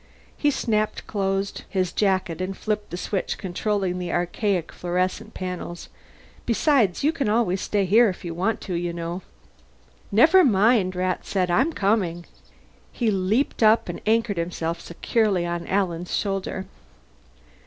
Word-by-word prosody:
He 290 - +2
snapped 215 -6 -1
closed 195 -1 -2
his 185 -2 0
jacket 185 -5 0
and 190 +1 -3
flipped 210 -1 -2
the 175 - -5
switch 190 +1 -2
controlling 190 0 -1
the 175 -1 -3
archaic 175 0 -1
fluorescent 180 +1 -2
panels. 180 -2 -6 0.6
"Besides, 235 - +2
you 300 - +4
can 280 -9 -1
always 210 -4 +1
stay 205 -2 0
here 220 +5 +5
if 185 - -7
you 170 - -4
want 190 +7 -1
to, 185 - -5
you 175 0 -2
know." 170 +2 -4 0.9
"Never 320 - +6
mind," 210 - +3
Rat 185 0 -1
said. 185 -3 0
"I'm 265 - +3
coming." 195 - 0 0.7
He 230 -3 0
leaped 205 +9 0
up 220 -3 +4
and 175 - -5
anchored 225 -3 +2
himself 170 0 -3
securely 195 +1 0
on 170 0 -3
Alan's 180 -3 -1
shoulder. 195 -1 -2
190 Hz, 145 wpm, -24 LUFS, 175-215 Hz, 0.9 s, Never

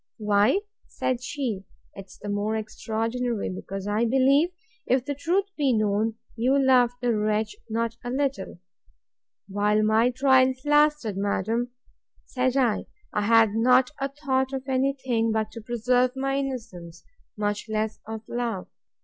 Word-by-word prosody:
Why, 210 - +3 0.3
said 255 -1 -2
she, 250 -8 -3 0.3
'tis 195 -1 -11
the 205 - -8
more 205 +2 -1
extraordinary, 225 +1 -2
because 190 +1 -6
I 210 +3 +1
believe, 270 +6 +4 0.4
if 255 0 +2
the 285 - -2
truth 345 +7 0
was 270 -4 +3
known, 215 +1 +1 0.2
you 250 +4 +2
loved 255 -3 +4
the 240 -2 +2
wretch 215 - 0
not 230 +1 -2
a 245 - -4
little. 265 -9 -2 0.9
While 210 +2 +1
my 220 +3 +4
trials 260 0 +3
lasted, 295 -8 +3
madam, 215 +4 -1 0.6
said 255 0 0
I, 245 -5 +1 0.3
I 210 - +1
had 220 0 +4
not 250 +4 +4
a 275 0 -1
thought 265 -2 -1
of 265 0 -4
any 265 +1 +1
thing, 230 -3 +1
but 220 -1 -1
to 230 - -8
preserve 245 +3 +1
my 270 0 -1
innocence, 220 -11 -6 0.3
much 210 +1 -2
less 215 0 -2
of 220 0 -5
love. 235 -6 -3
235 Hz, 145 wpm, -25 LUFS, 215-260 Hz, 0.9 s, believe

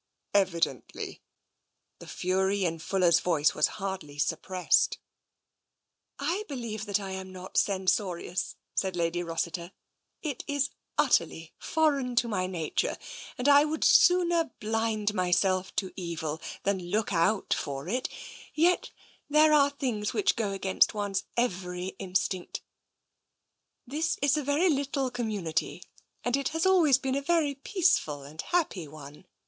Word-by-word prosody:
" - - -50
Evidently." 170 - -1 0.8
The - - -11
fury 190 +2 0
in 165 -1 -1
Fuller's 175 0 +3
voice 160 -4 +2
was 150 - +3
hardly 190 -8 -5
suppressed. 175 +4 +1 0.6
" - - -53
I 340 +9 -1
believe 230 -6 -5
that 205 0 +1
I 195 -1 -6
am 190 0 -6
not 185 0 -10
censorious," 185 -2 0 0.2
said 190 -2 -1
Lady 170 0 0
Rossiter. 170 +1 -3 0.3
" - - -52
It 260 - -8
is 285 -1 0 0.3
utterly 170 - +1
foreign 280 -6 +1
to 240 0 +3
my 185 -5 -1
nature, 170 -4 -2 0.4
and 250 - -1
I 285 0 +7
would 305 +1 -2
sooner 350 -2 +5
blind 220 -1 0
myself 185 0 +1
to 190 -2 -2
evil 165 -4 -4 0.2
than 195 -1 0
look 210 +1 0
out 180 +5 +2
for 140 +1 -4
it 250 +7 -1 0.3
— - - -17
yet 345 +3 +3 0.4
there 305 +1 +5
are 285 -1 +5
things 250 -7 -2
which 410 - +2
go 225 -4 -1
against 195 +2 +2
one's 200 -2 -2
every 180 -5 -1
instinct. 185 -1 -2 1.2
This 305 +6 -1
is 285 0 +4
a 305 - 0
very 285 +6 +2
little 275 -3 0
community 210 -9 -2 0.4
and 245 +1 +1
has 325 +2 -1
always 340 -8 +5
been 265 0 -2
a 280 - 0
very 310 -1 +1
peaceful 275 - +1
and 150 +3 -7
happy 300 - -1
one. 150 +3 -12
200 Hz, 140 wpm, -28 LUFS, 180-280 Hz, 1.2 s, I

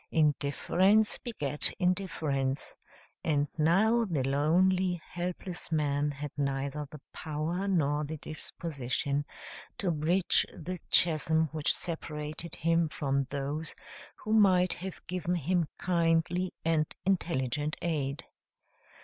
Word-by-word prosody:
Indifference 170 +7 +2
begat 150 - +1
indifference, 160 -8 -1 0.5
and 145 -2 +1
now 200 +9 +4
the 165 - -1
lonely, 180 +6 +3
helpless 175 0 -5
man 145 -2 +1
had 145 0 -5
neither 140 +1 -2
the 150 - -10
power 160 +5 -2
nor 150 -6 +2
the 155 +2 -4
disposition 140 -2 -3 0.5
to 185 -4 0
bridge 165 +4 +2
the 180 +2 -6
chasm 160 -1 +4
which 155 -1 +1
separated 155 -1 -4
him 165 0 +2
from 140 -2 0
those 145 +3 -4 0.4
who 215 - -3
might 185 -4 +5
have 190 0 -7
given 180 0 -1
him 175 +1 +1
kindly 170 +1 +1
and 160 -2 +1
intelligent 150 -5 0
aid. 145 -4 -1
160 Hz, 105 wpm, -30 LUFS, 145-180 Hz, 0.5 s, might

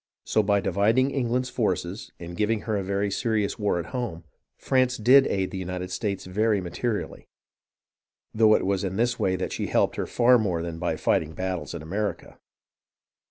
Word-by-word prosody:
So 110 - +2
by 100 -1 +2
dividing 110 +8 +2
England's 125 -1 -1
forces, 95 -3 -2
and 85 0 -8
giving 105 +2 0
her 110 -1 -2
a 100 - 0
very 100 +1 -1
serious 110 0 -1
war 105 -4 +1
at 85 -1 -5
home, 110 -10 -4 0.3
France 130 -1 +1
did 130 +5 +6
aid 95 -1 -1
the 95 - -4
United 90 0 -5
States 100 +1 -3
very 105 +3 +1
materially, 100 +5 -4 1.1
though 110 -1 +5
it - - 0
was 95 0 0
in 95 -1 -2
this 120 +3 0
way 95 -1 +1
that 95 - -3
she - - -3
helped - - +1
her - - -2
far 125 0 +4
more 90 -6 -1
than 85 -1 -5
by 85 - -1
fighting 80 0 0
battles 90 -3 -4
in 80 - -7
America. 100 +6 -4
100 Hz, 180 wpm, -26 LUFS, 90-115 Hz, 1.1 s, did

